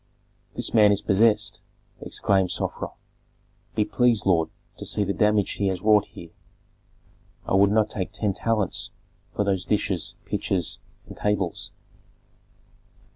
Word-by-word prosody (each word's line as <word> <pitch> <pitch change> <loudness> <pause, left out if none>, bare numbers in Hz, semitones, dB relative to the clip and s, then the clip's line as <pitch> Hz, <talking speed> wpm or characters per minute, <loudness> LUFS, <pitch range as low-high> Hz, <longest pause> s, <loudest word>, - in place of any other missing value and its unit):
"This - - -3
man 105 -2 +6
is 100 - +2
possessed!" 105 +2 +2 0.4
exclaimed 95 -2 +1
Sofra. - - -2 0.9
"Be 105 - +2
pleased, 120 -2 +2
lord, 85 -4 +3 0.3
to - - -7
see 105 - 0
the 100 0 -1
damage 105 -1 +2
he 100 - -1
has 95 -2 -2
wrought 105 -1 +5
here. 85 -1 -12 1.1
I - - -2
would 100 +1 +5
not 105 0 +2
take 95 -3 -3
ten 105 -1 -1
talents 110 -2 -1 0.5
for 105 - +1
those 95 -3 0
dishes, 95 -4 -1
pitchers, - - -2 0.3
and - - -11
tables." 105 -4 -1
100 Hz, 130 wpm, -25 LUFS, 95-105 Hz, 1.1 s, man